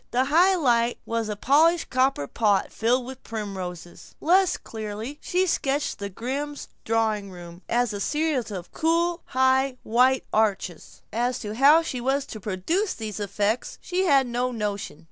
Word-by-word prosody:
The 255 +2 +1
high 350 +7 +4
light 240 -7 +2
was 230 -1 -2
a 210 - -2
polished 310 +9 +3
copper 255 - +2
pot 205 +5 +1
filled 240 +3 +1
with 260 0 -9
primroses. 190 -6 -7
Less 365 +2 +3
clearly 220 +6 -7
she 365 +1 +1
sketched 290 - -1
the 200 0 -4
Grimm 275 +8 -4 0.3
drawing 220 -3 0
room 175 -1 -11
as 240 -2 +1
a 205 - -4
series 295 -3 0
of 185 -4 -7
cool 335 +2 +1
high 260 0 +2
white 255 +3 +3
arches. 200 -6 -1
As 245 +2 0
to 210 -1 -5
how 285 +7 +6
she 255 -6 -4
was 270 +2 0
to 215 - -8
produce 215 - -1
these 215 -2 -5
effects 205 +3 -1
she 370 +1 -1
had 275 -6 +4
no 245 +1 -1
notion. 205 -8 -4
245 Hz, 160 wpm, -25 LUFS, 210-285 Hz, 0.3 s, how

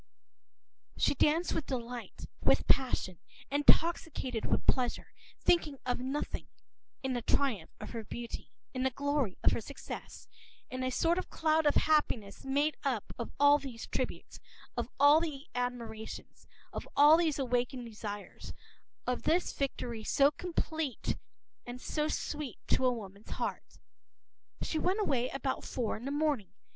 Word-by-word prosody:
p> - - -13
She - - +4
danced 315 +5 +2
with 300 - -2
delight, 245 -2 -5 0.2
with - - +4
passion, 245 -9 +2 0.3
intoxicated 290 -4 +3
with - - +1
pleasure, 250 -2 +1 0.3
thinking 310 -5 +3
of 245 -1 0
nothing, 265 +4 -3 0.6
in 265 -1 0
the 245 - -1
triumph 230 - +1
of - - -7
her 230 -2 -4
beauty, 235 +2 -6 0.2
in 255 - -2
the 265 - +3
glory 280 -5 0
of - - +6
her - - 0
success, 280 +6 -8 0.4
in 255 0 -3
a 255 - +1
sort 335 +7 +2
of - - -5
cloud 315 -1 +2
of 290 - +4
happiness 250 -10 +2
made 285 +2 +1
up 255 -7 -1
of 235 - -4
all 285 +1 +7
these 250 -5 -7
tributes, - - -4 0.4
of - - -2
all 290 +2 +8
the 300 -4 -4
admirations, 235 -3 -5 0.3
of - - -5
all 295 +2 +9
these 325 -4 +2
awakened 250 -1 0
desires, 210 -2 -7 0.5
of 250 0 0
this 345 +3 +2
victory 240 -5 -3
so 280 +5 +4
complete 320 -5 -2 0.5
and 245 +1 -7
so 300 +3 -1
sweet 300 -4 -3
to 260 - +4
a - - +4
woman’s 200 -3 -8
heart. - - -4 0.9
She 315 - -1
went 370 +6 +1
away 260 - +1
about 275 -1 -2
four 240 -4 -2
in 230 - -8
the 275 - -2
morning. 290 - 0
265 Hz, 150 wpm, -32 LUFS, 240-295 Hz, 0.9 s, all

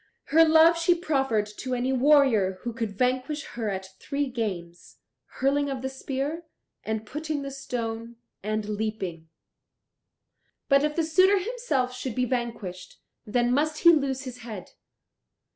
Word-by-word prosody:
Her 325 +1 +8
love 325 +1 +6
she 345 +1 +4
proffered 270 - 0
to 255 -1 -3
any 250 +2 0
warrior 255 -8 +4
who 235 - -4
could 220 -4 -4
vanquish 255 +5 0
her 225 -3 -2
at 190 -1 -4
three 280 -1 -2
games, 185 -8 -5 0.4
hurling 280 +2 +1
of 265 -2 -4
the 265 - -1
spear, 275 +5 -4 0.4
and 220 0 -3
putting 300 +3 -4
the 275 - -5
stone, 230 -3 -5 0.3
and 215 +1 -2
leaping. 205 -6 -4 1.4
But 275 -1 +4
if 300 0 0
the 330 - +1
suitor 370 +5 +4
himself 375 - -1
should 250 -2 -5
be 250 -1 +1
vanquished, 230 -7 -4 0.3
then 240 +2 +1
must 305 +3 0
he 340 - +9
lose 275 -3 0
his 250 -2 -8
head. 220 -6 -8
255 Hz, 145 wpm, -26 LUFS, 220-295 Hz, 1.4 s, he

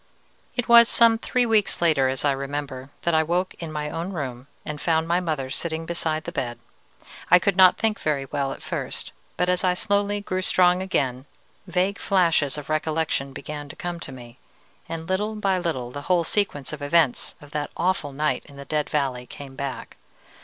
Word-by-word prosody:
"It 245 - -1
was 235 0 +8
some 230 -1 +5
three 250 +1 +1
weeks 220 -3 +2
later, 150 -6 +3
as 130 +2 -2
I 145 - +4
remember, 135 -1 -4
that 170 - +1
I 160 - +5
awoke 175 +4 0
in 165 -2 -5
my 150 -1 -3
own 170 +4 -4
room, 130 -5 -5 0.2
and 150 -1 -5
found 160 -1 +1
my 170 +1 +2
mother 155 -7 -2
sitting 165 +1 -3
beside 160 -2 -1
the - - -5
bed. 120 -1 -3 0.7
I 180 - +9
could 190 +2 +1
not 185 -1 +7
think 220 -1 0
very 145 -3 0
well 135 0 -2
at - - -8
first, - - -4 0.3
but 180 - +1
as 180 +1 +1
I 180 -1 +3
slowly 205 0 +1
grew 185 -2 -2
strong 180 -1 +4
again, 135 -8 -1 0.4
vague 185 +3 0
flashes 165 -7 +2
of 145 -2 -7
recollection 155 -2 -1
began 145 +1 -7
to - - -9
come 175 -1 -4
to 150 - -8
me, 120 -1 -12 0.5
and 165 0 -5
little 210 +3 -1
by 195 -3 +1
little 130 -9 -2
the 145 - -6
whole 180 -2 +4
sequence 160 -8 -1
of 150 - -6
events 145 -2 +2
of 145 -1 -14
that 150 -1 -2
awful 180 -5 0
night 150 +3 -1
in 140 - -14
the 140 0 -9
Dead 150 0 -1
Valley 130 -4 -1
came 135 0 -10
back. 140 0 -5
160 Hz, 195 wpm, -24 LUFS, 140-185 Hz, 0.7 s, I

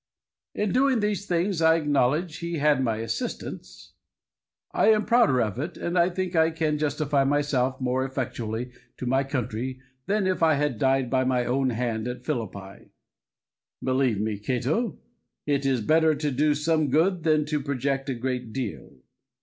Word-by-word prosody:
In 210 -2 0
doing 260 -1 +3
these 210 -1 -1
things 175 0 0
I 160 0 +5
acknowledge 150 +1 +1
he 170 0 -4
had 145 -2 +3
my 115 -3 0
assistance. 115 0 -6 0.8
I - - +2
am 215 -1 +4
prouder 230 - +4
of 110 +1 -2
it, 160 +4 -4
and 170 - -3
I 175 0 +4
think 185 0 -3
I 160 0 +4
can 160 -2 -1
justify 145 -2 +1
myself 135 -2 0
more 130 0 0
effectually 125 -3 -4 0.3
to - - -5
my 130 +2 +2
country, 130 -1 -3 0.3
than 205 0 +1
if 185 -1 0
I 160 -2 +5
had 140 -5 -1
died 135 -2 +1
by 130 -1 +2
my 125 -1 +1
own 130 +2 +1
hand 115 -1 -2
at 125 0 -6
Philippi. 100 -5 -5 0.9
Believe 130 -4 +1
me, 105 -1 -2
Cato, 130 - -1 0.5
it 140 -1 0
is 130 -3 +1
better 160 +6 +3
to 145 0 -2
do 145 +3 +2
some 155 0 +1
good 170 +6 +2
than 155 -2 +2
to 150 -1 -1
project 135 0 -2
a 130 - -1
great 125 -1 -3
deal. 125 - -6
140 Hz, 165 wpm, -26 LUFS, 125-160 Hz, 0.9 s, I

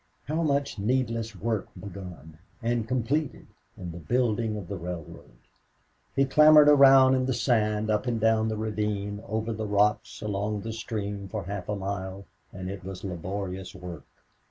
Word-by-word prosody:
How 155 +4 -1
much 140 -6 0
needless 115 -1 -1
work 110 +1 -2
begun 90 -5 -9 0.2
and 115 -1 0
completed 130 +4 -1 0.3
in 90 -2 -6
the 85 - -8
building 110 +4 0
of 100 -4 -7
the 100 - -4
railroad! 85 -8 -8 0.8
He 135 - +4
clambered 150 +2 +7
around 135 -2 +8
in 130 -1 +1
the 130 - 0
sand, 110 -3 +1
up 105 +4 0
and 115 -2 0
down 110 0 +3
the 110 - -2
ravine, 105 -1 -2
over 110 +2 -2
the 110 0 -4
rocks, 105 +1 +1
along 105 0 -2
the 115 +1 -5
stream 105 -3 -4
for 105 0 -4
half 100 +2 -6
a 105 - 0
mile, 95 0 -5 0.3
and 95 -1 -7
it 95 -1 -6
was 95 -1 -7
laborious 95 +1 -5
work. 90 -5 -9
105 Hz, 160 wpm, -27 LUFS, 95-115 Hz, 0.8 s, around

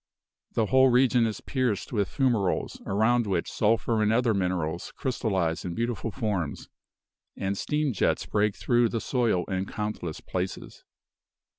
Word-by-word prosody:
The 110 - +2
whole 130 +3 +5
region 125 -1 +4
is 110 - -5
pierced 125 -8 -1
with 100 -4 0
fumaroles, 120 -9 0
around 110 +3 +2
which 90 -4 -1
sulphur 110 +1 +1
and 105 0 +3
other 115 0 +3
minerals 90 -4 -2
crystalize 95 - -1
in 85 -2 -4
beautiful 115 -1 -2
forms; 105 - -3 0.7
and 100 0 -1
steam 150 +5 -1
jets 100 - +1
break 105 -1 +1
through 120 -1 +2
the 115 - -2
soil 115 -8 +1
in 95 0 -2
countless 105 -7 -4
places. 90 0 -5
110 Hz, 140 wpm, -27 LUFS, 95-120 Hz, 0.7 s, whole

